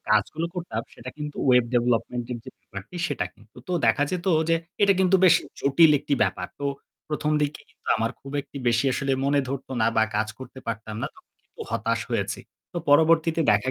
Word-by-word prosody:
কাজগুলো 110 +10 +2
করতাম 170 -11 -3
সেটা 130 +2 -8
কিন্তু 150 -1 -5
web 125 -1 +6
development 120 0 +1
এর 120 - -4
যে 130 - -8
ব্যাপারটি 100 - -10
সেটা 145 - -1
কিন্তু। 110 0 -23
তো - - -2
দেখা 115 +5 +3
যেত 180 -1 -3 0.2
যে 165 - +4 0.3
এটা 200 -1 +6
কিন্তু 190 0 +5
বেশ 175 -2 +8 0.3
জটিল 145 +4 +5
একটি 145 - 0
ব্যাপার। 95 -3 -1
তো - - -3 0.4
১ম 150 0 -1
দিকে 145 +1 -2
কিন্তু - - -14
আমার 115 +1 0
খুব 135 - -10
একটি 140 - -15
বেশি 115 +2 +2
আসলে 135 +1 0
মনে 140 +1 +3
ধরতো 135 0 -5
না - - +4
বা 110 - +5
কাজ 110 0 0
করতে 130 0 -10
পারতাম 110 -1 -4
না। - - 0
তখন - - -22
কিন্তু - - -18
হতাশ - - 0
হয়েছি। - - -1 0.3
তো 175 - -2
পরবর্তীতে 160 +2 +4
দেখা 105 +5 +2
135 Hz, 195 wpm, -25 LUFS, 115-155 Hz, 0.4 s, বেশ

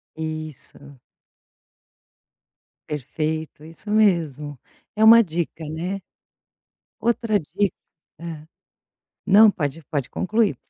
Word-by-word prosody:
Isso. 155 -3 -6 1.9
Perfeito, 155 +2 -3
isso 165 +6 -1
mesmo. 160 - +1 0.4
É 215 - +2
uma 230 +1 +9
dica, 165 -2 -4
né, 180 +5 -4 1.0
outra 230 -2 +1
dica, 195 +4 -1 0.4
hã, 160 -2 -8 0.8
não 210 +2 +8
pode, 155 -3 -3
pode 140 -3 -3
concluir. 210 - 0
160 Hz, 85 wpm, -23 LUFS, 150-205 Hz, 1.9 s, uma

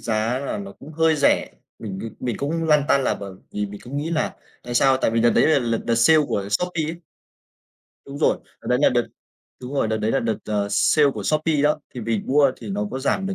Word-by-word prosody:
giá 115 +3 -1
là 140 +8 -4
nó 200 0 -7
cũng 155 -5 -13
hơi 160 0 +2
rẻ, 140 - +2 0.3
mình 100 -4 -6
cứ 115 - -5
mình 120 -4 -2
cũng 165 +3 -2
lăn 150 -2 +4
tăn 135 -1 +3
là - - +1
bởi 100 -1 -8 0.2
vì 105 0 -2
mình 100 0 -10
cũng 135 +4 -6
nghĩ 155 +3 -2
nà, 155 -2 -1 0.3
tại 120 0 -6
sao? 135 +1 +4
Tại 120 - +1
vì 115 0 +1
đợt 120 0 +4
đấy - - +3
là 155 -3 +4
lợt 115 -2 -1
đợt 115 - +2
sale 135 +8 +5
của 100 0 -2
Shopee 170 +7 0
ấy. 165 +2 -5 1.1
Đúng 140 +1 -8
rồi, - - +2 0.2
đợt - - -14
đấy 125 0 +2
là - - +7
đợt 120 -1 +1 0.5
đúng 130 +3 -7
rồi, 115 - +1
đợt 110 - 0
đấy 110 +1 -1
là - - +2
đợt, 115 -1 -1
ờ, 105 -1 -1
sale 140 +8 +4
của 110 -5 -6
Shopee 155 +5 +1
đó. 150 +1 +2
Thì 125 - -5
mình 115 -2 -2
mua 140 0 +4
thì 110 -4 -8
nó 105 +1 -2
có 130 - -4
giảm 190 +8 0
được 195 - -2
130 Hz, 255 wpm, -22 LUFS, 110-150 Hz, 1.1 s, là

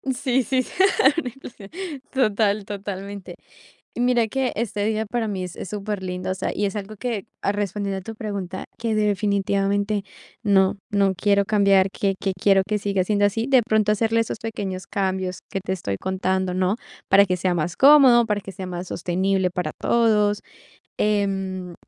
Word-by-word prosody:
Sí, 260 -1 +1
sí, 255 +3 +1 0.6
una 330 - -1
inflación. 235 -5 -12 0.4
Total, 215 -5 +2
totalmente. 200 -2 -6 0.6
Mira 245 -1 +2
que 265 +3 -1
este 210 -2 -2
día 220 0 0
para 230 +1 -2
mí 195 -3 -3
es 180 0 -7
es 180 - -7
superlindo, 190 -3 -4
o - - +1
sea, 190 - -2
y 205 - -1
es 195 - -3
algo 210 +1 -5
que, 225 -4 -3 0.2
a - - +1
respondiendo 200 -1 -2
a - - -10
tu 225 +4 -8
pregunta, 200 -4 -5
que 230 0 -1
definitivamente 200 0 +1 0.4
no 195 -1 +3
no 200 -1 +2
quiero 200 +1 +2
cambiar, 200 -2 +4
que 195 -1 -1
que 195 -1 -1
quiero 195 +1 +4
que 210 0 0
siga 200 -2 0
siendo 205 +1 +2
así. 225 +4 0
De 265 -3 +5
pronto, 215 -2 +2
hacerle 225 +2 +1
esos 225 - -3
pequeños 195 -5 -5
cambios 190 -2 -2
que 195 - -3
te 190 - -3
estoy 100 - -3
contando, 190 - -1
¿no?, 185 +2 +1 0.3
para 200 +1 +7
que 185 -2 -1
sea 180 0 0
más 175 +1 -2
cómodo, 265 -4 +7
para 210 -2 -1
que 195 - -8
sea 185 +1 -6
más 180 0 -5
sostenible 185 +2 0
para 180 0 -3
todos, 210 -3 +2 0.6
em, 195 -3 -1
200 Hz, 175 wpm, -23 LUFS, 190-215 Hz, 0.6 s, para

